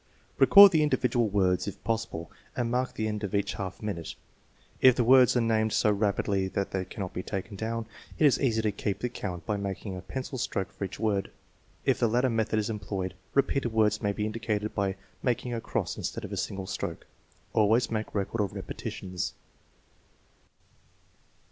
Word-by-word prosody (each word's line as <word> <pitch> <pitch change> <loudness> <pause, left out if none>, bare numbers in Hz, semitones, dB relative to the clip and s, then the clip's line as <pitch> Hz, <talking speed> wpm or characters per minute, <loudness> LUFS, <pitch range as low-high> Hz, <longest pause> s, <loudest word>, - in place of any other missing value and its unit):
Record 200 -1 +10
the 160 -3 +3
individual 125 -6 +2
words 95 -2 +1
if 100 - -7
possible, 110 -8 -3 0.2
and 120 -1 -1
mark 125 +1 -1
the 110 - -1
end 105 0 -3
of 100 -1 -2
each 100 0 0
half 95 0 -6
minute. 90 -6 -4 0.7
If 130 -2 +7
the 125 - +2
words 125 +1 +6
are - - +3
named 110 -2 +1
so 105 - +3
rapidly 100 -1 +1
that 100 +1 -2
they 95 -1 -2
cannot 95 0 -6
be 90 - -3
taken 100 +1 -5
down, 115 +2 -3 0.3
it 155 - +4
is 140 - +4
easy 115 -5 +2
to 105 - +2
keep 100 0 -2
the 125 - -2
count 90 -7 -5
by 105 - -1
making 100 0 -4
a 90 - -6
pencil 130 +6 -5
stroke 95 -4 -2
for 100 - -4
each 95 - -8
word. 100 -3 0 0.6
If - - +2
the 120 - +3
latter 125 +3 +2
method 110 -1 0
is 105 -1 0
employed, 95 -3 -3 0.2
repeated 140 -3 +2
words 105 -1 +2
may 100 - +1
be 105 +1 -2
indicated 110 -1 -2
by 100 -2 0 0.3
making 125 0 -1
a 115 - -2
cross - - -2
instead - - -4
of - - -9
a - - -1
single 95 -1 -3
stroke. 95 -3 -5 0.5
Always 110 +3 +3
make 110 -1 -3
record 105 +2 -1
of 100 - -2
repetitions. 90 -1 -5
105 Hz, 185 wpm, -28 LUFS, 100-115 Hz, 0.7 s, Record